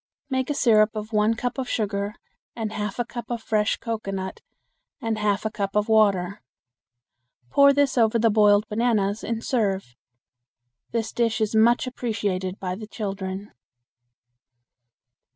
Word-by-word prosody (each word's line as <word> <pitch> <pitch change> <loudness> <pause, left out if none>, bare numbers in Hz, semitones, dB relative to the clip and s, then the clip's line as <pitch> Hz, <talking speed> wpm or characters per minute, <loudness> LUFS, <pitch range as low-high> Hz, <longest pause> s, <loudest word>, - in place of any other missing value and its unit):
Make 260 +1 0
a 290 - 0
syrup 220 -5 +4
of 215 +1 -6
one 210 +2 +3
cup 245 +3 -3
of 255 - -3
sugar 205 -1 -2 0.4
and 220 -2 -3
half 210 -2 -3
a 240 - -1
cup 240 -1 -7
of 235 -2 -3
fresh 210 -1 +1
cocoanut 195 -5 -4 0.6
and 225 -4 -2
half 210 0 0
a 220 - 0
cup 200 -2 -3
of 210 0 +2
water. 200 -3 +3 1.1
Pour 280 0 +7
this 280 -2 +2
over 225 0 +4
the 225 0 +3
boiled 205 0 +4
bananas 215 -2 0
and 230 -1 -3
serve. 195 - -1 0.9
This 225 -1 -2
dish 230 -2 +1
is 215 -1 0
much 235 +3 +4
appreciated 205 -7 -3
by 180 -1 -3
the 215 +3 -7
children. 195 -2 -5
215 Hz, 145 wpm, -24 LUFS, 205-230 Hz, 1.1 s, Pour